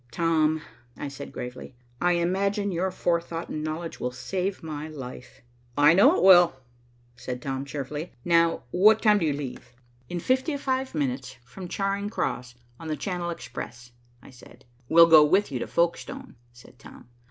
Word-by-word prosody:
"Tom," 160 Hz, +1 st, +1 dB, 0.3 s
I -, -, -5 dB
said 140 Hz, 0 st, -9 dB
gravely, 125 Hz, +1 st, -8 dB, 0.3 s
"I 175 Hz, 0 st, +3 dB
imagine 195 Hz, +4 st, 0 dB
your 180 Hz, +2 st, -1 dB
forethought 170 Hz, -2 st, -2 dB
and 155 Hz, -, -4 dB
knowledge 160 Hz, +2 st, -5 dB
will 125 Hz, -, -2 dB
save 185 Hz, +10 st, -4 dB
my 155 Hz, -1 st, -5 dB
life." 130 Hz, -4 st, -10 dB, 0.4 s
"I 145 Hz, +2 st, +6 dB
know 255 Hz, -, +6 dB
it -, -, 0 dB
will," 175 Hz, -5 st, +7 dB, 0.6 s
said 125 Hz, 0 st, -6 dB
Tom 135 Hz, +1 st, -4 dB
cheerfully. 145 Hz, +3 st, -5 dB
"Now, 170 Hz, -4 st, +3 dB
what 210 Hz, +4 st, +5 dB
time 210 Hz, -2 st, +5 dB
do 165 Hz, -, 0 dB
you 145 Hz, -, +1 dB
leave?" 130 Hz, -3 st, -7 dB, 0.4 s
"In 175 Hz, -, -3 dB
fifty 260 Hz, -, 0 dB
five 265 Hz, -5 st, -2 dB
minutes, 130 Hz, -3 st, -3 dB
from 180 Hz, +9 st, -10 dB
Charing 200 Hz, +2 st, -2 dB
Cross, 125 Hz, -, -3 dB, 0.2 s
on 165 Hz, -, -8 dB
the 155 Hz, -1 st, -2 dB
Channel 180 Hz, -3 st, -3 dB
Express," 120 Hz, -5 st, -8 dB, 0.3 s
I -, -, -14 dB
said. 125 Hz, -, -17 dB, 0.2 s
"We'll 165 Hz, +1 st, +8 dB
go 160 Hz, -2 st, +8 dB
with 190 Hz, +4 st, +2 dB
you 130 Hz, -, -3 dB
to -, -, -4 dB
Folkestone," 245 Hz, +10 st, -2 dB, 0.2 s
said 120 Hz, +1 st, -18 dB
Tom. -, -, -14 dB
165 Hz, 165 wpm, -26 LUFS, 140-190 Hz, 0.6 s, We'll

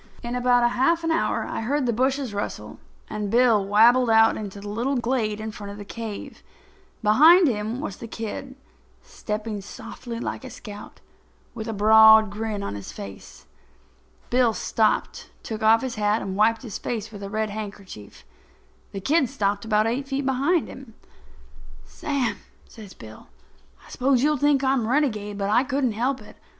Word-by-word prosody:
In 240 Hz, +1 st, -4 dB
about 245 Hz, -1 st, +3 dB
half 330 Hz, +7 st, +1 dB
an 330 Hz, -, 0 dB
hour 325 Hz, -, 0 dB
I -, -, -4 dB
heard 275 Hz, +4 st, -1 dB
the 235 Hz, -, 0 dB
bushes 260 Hz, 0 st, 0 dB
rustle, 205 Hz, -, -5 dB, 0.3 s
and 210 Hz, -1 st, -4 dB
Bill 230 Hz, -2 st, +4 dB
wabbled 230 Hz, +5 st, +4 dB
out 225 Hz, 0 st, +5 dB
into 205 Hz, -2 st, -7 dB
the 205 Hz, -, -9 dB
little 235 Hz, +7 st, -1 dB
glade 235 Hz, -4 st, -1 dB
in 220 Hz, 0 st, -5 dB
front 205 Hz, -1 st, -8 dB
of 200 Hz, -, -9 dB
the 205 Hz, -, -9 dB
cave. 220 Hz, -1 st, -7 dB, 0.6 s
Behind 315 Hz, -, +6 dB
him 220 Hz, 0 st, -2 dB
was 200 Hz, -11 st, -5 dB
the 230 Hz, -, -8 dB
kid, 230 Hz, +4 st, -6 dB, 0.5 s
stepping 210 Hz, -1 st, -5 dB
softly 230 Hz, +3 st, -8 dB
like 245 Hz, -, -5 dB
a 260 Hz, -, -8 dB
scout, 210 Hz, -4 st, -11 dB, 0.5 s
with 220 Hz, -, -6 dB
a -, -, -2 dB
broad 220 Hz, 0 st, +6 dB
grin 210 Hz, -1 st, -4 dB
on -, -, -4 dB
his 100 Hz, -1 st, -8 dB
face. 100 Hz, -1 st, -11 dB, 0.9 s
Bill 245 Hz, -2 st, +3 dB
stopped, 220 Hz, -1 st, -1 dB
took 220 Hz, -1 st, -6 dB
off 225 Hz, +2 st, +4 dB
his 260 Hz, -2 st, -3 dB
hat 210 Hz, +1 st, +1 dB
and 190 Hz, -1 st, -4 dB
wiped 225 Hz, +4 st, +2 dB
his 220 Hz, -6 st, -6 dB
face 220 Hz, -2 st, -4 dB
with 205 Hz, -2 st, -10 dB
a 200 Hz, -, -6 dB
red 215 Hz, 0 st, -2 dB
handkerchief. 200 Hz, -, -9 dB, 0.7 s
The 195 Hz, -, -5 dB
kid 280 Hz, -, +2 dB
stopped 205 Hz, -5 st, -1 dB
about 215 Hz, -1 st, +2 dB
eight 250 Hz, +5 st, -2 dB
feet 275 Hz, 0 st, -2 dB
behind 275 Hz, +6 st, +1 dB
him. -, -, -12 dB, 0.9 s
"Sam," 265 Hz, -8 st, -2 dB, 0.3 s
says 210 Hz, -4 st, -13 dB
Bill, 110 Hz, -1 st, -13 dB, 0.6 s
"I -, -, -17 dB
suppose 255 Hz, 0 st, +1 dB
you'll 300 Hz, 0 st, +2 dB
think 285 Hz, 0 st, +2 dB
I'm 265 Hz, -2 st, +2 dB
a 220 Hz, -, -3 dB
renegade, 215 Hz, -8 st, 0 dB
but 200 Hz, 0 st, -1 dB
I 240 Hz, +4 st, +4 dB
couldn't 270 Hz, -2 st, 0 dB
help 255 Hz, +5 st, -2 dB
it. -, -, -16 dB
225 Hz, 175 wpm, -24 LUFS, 210-260 Hz, 0.9 s, Behind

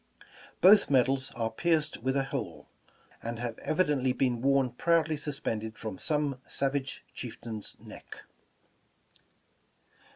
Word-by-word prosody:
Both 200 Hz, +4 st, +7 dB
medals 135 Hz, 0 st, +2 dB
are 115 Hz, -1 st, -1 dB
pierced 160 Hz, +5 st, +1 dB
with 130 Hz, +3 st, 0 dB
a 135 Hz, -, +2 dB
hole, 135 Hz, -4 st, -5 dB, 0.5 s
and 115 Hz, 0 st, -4 dB
have 120 Hz, -1 st, -4 dB
evidently 145 Hz, -6 st, +1 dB
been 125 Hz, -3 st, 0 dB
worn 135 Hz, -1 st, +3 dB
proudly 160 Hz, +4 st, +2 dB
sus 150 Hz, -1 st, -4 dB
pended 110 Hz, -4 st, -3 dB
from 110 Hz, -4 st, -6 dB
some 150 Hz, -4 st, -1 dB
savage 135 Hz, 0 st, -2 dB
chieftain's 110 Hz, -3 st, -7 dB
neck. -, -, -11 dB
135 Hz, 120 wpm, -30 LUFS, 120-150 Hz, 0.5 s, Both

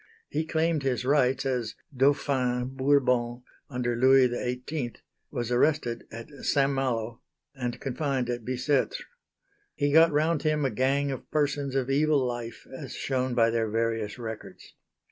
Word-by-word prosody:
He 155 Hz, +2 st, -2 dB
claimed 160 Hz, -1 st, +1 dB
his 125 Hz, -3 st, -1 dB
rights, 135 Hz, -1 st, +2 dB
as 125 Hz, -5 st, -1 dB, 0.2 s
"Dauphin" 130 Hz, -2 st, +1 dB
Bourbon 125 Hz, -3 st, +2 dB, 0.3 s
under 125 Hz, -3 st, -1 dB
Louis 130 Hz, +1 st, +5 dB
XVIII, 125 Hz, +1 st, -3 dB, 0.4 s
was 120 Hz, 0 st, -3 dB
arrested 125 Hz, -2 st, +1 dB
at 115 Hz, +1 st, -8 dB, 0.2 s
St. 140 Hz, 0 st, +2 dB
Malo, 120 Hz, -4 st, -2 dB, 0.3 s
and 125 Hz, -3 st, -4 dB
confined 135 Hz, -1 st, -1 dB
at 120 Hz, -1 st, -3 dB
Bicêtre. 130 Hz, +3 st, 0 dB, 0.8 s
He 145 Hz, 0 st, +1 dB
got 165 Hz, +1 st, +7 dB
round 155 Hz, +1 st, +1 dB
him 155 Hz, -2 st, +1 dB
a 135 Hz, -, +1 dB
gang 140 Hz, +2 st, +1 dB
of 135 Hz, -, -7 dB
persons 145 Hz, -2 st, 0 dB
of 135 Hz, 0 st, 0 dB
evil 145 Hz, -1 st, +3 dB
life, 120 Hz, -2 st, -5 dB
as 135 Hz, -1 st, -7 dB
shown 130 Hz, -2 st, -1 dB
by 115 Hz, -1 st, +4 dB
their 115 Hz, -1 st, 0 dB
various 115 Hz, -1 st, -1 dB
records. 110 Hz, -2 st, -8 dB
130 Hz, 145 wpm, -27 LUFS, 120-140 Hz, 0.8 s, got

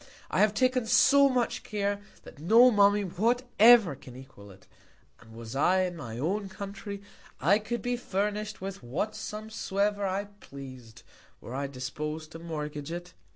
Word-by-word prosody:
I -, -, 0 dB
have 210 Hz, 0 st, +3 dB
taken 255 Hz, -1 st, +1 dB
so 280 Hz, +4 st, +6 dB
much 250 Hz, -2 st, 0 dB
Care, 205 Hz, -1 st, -2 dB, 0.2 s
that -, -, -14 dB
no 230 Hz, +10 st, +6 dB
Mummy 205 Hz, -1 st, +4 dB
whatever 230 Hz, -, +4 dB
can 130 Hz, -2 st, -13 dB
equal 130 Hz, -6 st, -13 dB
it: 95 Hz, 0 st, -16 dB, 0.5 s
And 115 Hz, -, -17 dB
was 115 Hz, +1 st, -8 dB
I 180 Hz, +7 st, +3 dB
in 180 Hz, -1 st, -2 dB
my 115 Hz, -8 st, -7 dB
own 195 Hz, +9 st, -2 dB
Country, 200 Hz, +1 st, -7 dB, 0.4 s
I 190 Hz, +9 st, +4 dB
could 235 Hz, +2 st, -4 dB
be 245 Hz, 0 st, 0 dB
furnish'd 210 Hz, -1 st, -3 dB
with 195 Hz, 0 st, -6 dB
what 155 Hz, -, -3 dB
Sum 215 Hz, +1 st, -7 dB
soever 205 Hz, -1 st, -1 dB
I 195 Hz, +1 st, -1 dB
pleas'd, 130 Hz, -, -11 dB, 0.4 s
were 120 Hz, -, -9 dB
I 140 Hz, +1 st, -2 dB
dispos'd 150 Hz, +4 st, -6 dB
to 165 Hz, -, -9 dB
mortgage 150 Hz, -2 st, -5 dB
it. 175 Hz, +1 st, -7 dB
195 Hz, 160 wpm, -28 LUFS, 145-215 Hz, 0.5 s, so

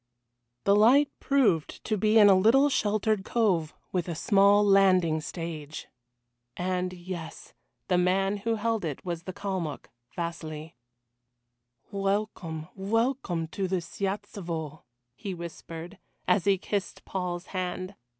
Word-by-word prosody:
The 200 Hz, -, +4 dB
light 265 Hz, +7 st, +5 dB
proved 215 Hz, -, +1 dB
to 215 Hz, -, 0 dB
be 215 Hz, +2 st, +3 dB
in 210 Hz, -2 st, +8 dB
a 200 Hz, -, +8 dB
little 230 Hz, +10 st, +5 dB
sheltered 215 Hz, -4 st, +1 dB
cove, 190 Hz, -9 st, +1 dB, 0.2 s
with 180 Hz, -2 st, -1 dB
a 170 Hz, -, -3 dB
small 200 Hz, +4 st, +4 dB
landing 185 Hz, -5 st, +4 dB
stage. 160 Hz, -2 st, -6 dB, 0.7 s
And 180 Hz, 0 st, -1 dB
yes 175 Hz, -2 st, -8 dB, 0.3 s
the 180 Hz, -1 st, +3 dB
man 195 Hz, +3 st, +2 dB
who 225 Hz, +3 st, -1 dB
held 225 Hz, -1 st, -1 dB
it 155 Hz, -1 st, -4 dB
was 170 Hz, -2 st, -3 dB
the 185 Hz, -, -4 dB
Kalmuck, 185 Hz, -7 st, -4 dB, 0.2 s
Vasili. 160 Hz, -2 st, -5 dB, 1.2 s
"Welcome, 195 Hz, -5 st, -2 dB
welcome 205 Hz, -4 st, 0 dB
to 190 Hz, +4 st, -2 dB
the 185 Hz, 0 st, 0 dB
Siyatelstvo," 175 Hz, -5 st, -4 dB, 0.3 s
he 190 Hz, +8 st, -6 dB
whispered, 170 Hz, +2 st, -8 dB, 0.3 s
as 180 Hz, 0 st, +3 dB
he 200 Hz, -1 st, +4 dB
kissed 195 Hz, +1 st, -4 dB
Paul's 180 Hz, -1 st, -3 dB
hand. 185 Hz, +1 st, -3 dB
185 Hz, 125 wpm, -28 LUFS, 170-205 Hz, 1.2 s, in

